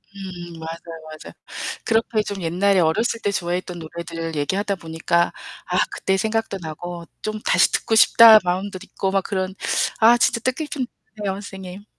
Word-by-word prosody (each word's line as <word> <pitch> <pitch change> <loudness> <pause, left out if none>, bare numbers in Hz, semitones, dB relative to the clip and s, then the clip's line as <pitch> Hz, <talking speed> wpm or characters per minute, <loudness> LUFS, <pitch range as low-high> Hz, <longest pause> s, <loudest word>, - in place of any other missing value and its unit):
음 175 -4 -8
맞아요, 165 0 -8 0.2
맞아요. - - -11 0.5
그렇게 225 -1 +1
좀 200 -3 -5
옛날에 185 +3 +2
어렸을 225 +8 +1
때 205 - +1
좋아했던 175 0 -3
노래들 165 0 -6
얘기하다 195 +7 0
보니까 170 0 0 0.3
아 - - 0
그때 190 0 0
생각도 220 -2 -1
나고 170 +2 -7 0.2
'좀 215 0 -3
다시 - - +3
듣고 225 - 0
싶다.' 225 0 +9
마음도 185 +2 -2
있고 195 -1 -3
막 195 -1 +1
그런 190 -1 -2 0.4
아 235 +2 +7
진짜 235 0 +2
뜻깊은 260 +1 -2 0.4
네요, 195 -1 0
선생님. 195 -1 -9
190 Hz, 330 characters per minute, -22 LUFS, 170-215 Hz, 0.5 s, 싶다